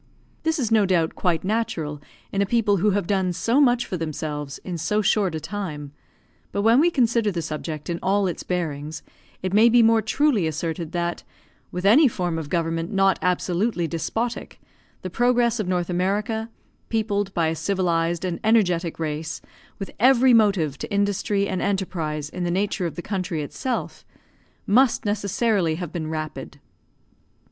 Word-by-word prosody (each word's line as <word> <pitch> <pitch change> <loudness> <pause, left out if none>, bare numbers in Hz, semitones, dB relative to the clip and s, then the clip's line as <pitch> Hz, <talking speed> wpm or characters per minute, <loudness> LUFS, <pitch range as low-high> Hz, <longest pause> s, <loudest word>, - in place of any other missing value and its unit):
This 320 0 0
is 235 -6 -1
no 215 -3 +4
doubt 170 -4 +1
quite 170 -3 0
natural 170 -8 -2 0.3
in 195 - 0
a - - +3
people 210 -2 +2
who 205 +4 +2
have 200 -2 0
done 190 -1 0
so 230 - +2
much 245 -3 +3
for 185 - -4
themselves 150 -3 -4
in 175 -3 -5
so 210 +7 0
short 195 -4 +2
a - - -2
time; 155 -7 -5 0.6
but 200 - -1
when 230 +4 +5
we 335 +4 +5
consider 235 -7 +2
the 170 -3 -3
subject 155 0 -5
in 170 -1 -3
all 200 +1 +2
its 180 -3 -3
bearings, 155 -4 -4 0.4
it 185 0 -2
may 220 +3 +6
be 235 0 +5
more 225 0 +4
truly 220 - +1
asserted 160 +1 -3
that, 175 0 -2 0.5
with 180 +1 -4
any 265 +9 +7
form 175 -7 -2
of 150 -3 -7
government 165 +1 -1
not 195 -2 +3
absolutely 180 +2 0
despotic, 225 +9 -3 0.4
the 185 - -4
progress 240 +1 +2
of 210 - -2
North 180 -1 0
America, 210 +5 -1 0.4
peopled 205 -3 -1
by 165 -2 +2
a 165 - -2
civilised 170 -1 0
and 175 -2 -3
energetic 180 -7 +2
race, 160 0 -4 0.4
with 195 - -6
every 255 +1 +5
motive 195 - +3
to - - -6
industry 200 0 0
and 190 -2 -2
enterprise 165 -7 -2
in 180 +4 -5
the 175 - -1
nature 190 0 0
of 165 - -7
the 175 - -6
country 185 -6 -3
itself, 250 - -4 0.6
must 245 +4 +3
necessarily 205 -4 +1
have 175 -1 -5
been 165 -3 -4
rapid. 155 -1 -6
185 Hz, 170 wpm, -23 LUFS, 165-215 Hz, 0.6 s, any